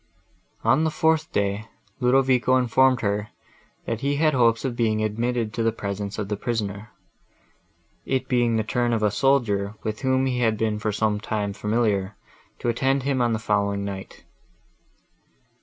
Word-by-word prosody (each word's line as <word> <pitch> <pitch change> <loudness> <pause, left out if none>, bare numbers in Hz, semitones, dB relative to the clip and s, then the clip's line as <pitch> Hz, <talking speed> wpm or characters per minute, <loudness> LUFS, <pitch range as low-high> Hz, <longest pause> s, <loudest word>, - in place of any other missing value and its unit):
On 155 - +3
the 160 - +2
fourth 160 0 +1
day, 100 +1 -1 0.3
Ludovico 130 0 +3
informed 130 0 +3
her, 105 0 -1 0.6
that 115 0 -3
he 140 +1 0
had 155 +1 +2
hopes 115 -1 +3
of 125 -3 -2
being 110 -2 +1
admitted 115 +1 -1
to 115 - -2
the 115 0 +2
presence 100 -1 -5
of 105 -2 -3
the 105 - -2
prisoner; 105 -2 -3 1.1
it 130 0 -1
being 120 -3 +2
the 110 - +1
turn 120 +2 0
of 110 -2 0
a 105 - +3
soldier, 105 -5 +1
with 110 -1 -3
whom 130 0 +2
he 125 -2 -1
had 110 -3 +2
been 110 -1 -1
for 105 0 -1
some 105 0 0
time 105 -1 -2
familiar, 105 -2 0 0.4
to - - -5
attend 135 +3 +1
him 135 -2 0
on 120 -1 +2
the - - +1
following 100 -2 0
night. 95 -1 -7
115 Hz, 165 wpm, -24 LUFS, 105-130 Hz, 1.1 s, On